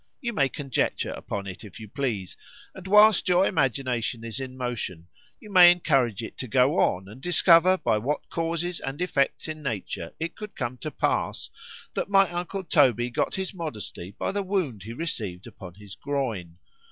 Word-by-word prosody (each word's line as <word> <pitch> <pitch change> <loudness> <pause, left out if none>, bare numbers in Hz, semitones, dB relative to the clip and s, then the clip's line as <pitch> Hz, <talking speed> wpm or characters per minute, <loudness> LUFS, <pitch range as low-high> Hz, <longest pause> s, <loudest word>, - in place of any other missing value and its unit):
—You 240 -4 -3
may 140 -8 +2
conjecture 135 -3 -1
upon 100 -1 -5
it, 95 +2 -8
if 105 -1 -11
you 110 - -9
please,——and 125 - -6
whilst 210 -1 +6
your 180 +2 +5
imagination 125 - 0
is 115 +2 -3
in 130 -1 -6
motion, 115 -9 -4 0.3
you 210 - -13
may 180 -2 +9
encourage 135 - +1
it - - -9
to 130 - -4
go 130 - +3
on, 95 +1 +1
and 110 +6 -12
discover 175 +2 +5
by 110 - +1
what 140 +7 -2
causes 170 +1 -2
and 135 +2 -5
effects 165 -6 0
in 155 -1 -6
nature 105 - -4
it 165 +1 -4
could 210 -1 -9
come 125 -1 -4
to - - -4
pass, - - -1 0.4
that - - -2
my 195 -1 +5
uncle 175 +3 -4
Toby 125 - +3
got - - -1
his 190 0 -3
modesty 115 - -5
by - - -1
the 205 - -1
wound 185 - -2
he 110 +5 -7
received 110 - -4
upon 95 -6 -11
his 100 -1 -11
groin. 115 - -3
135 Hz, 175 wpm, -26 LUFS, 110-175 Hz, 0.4 s, may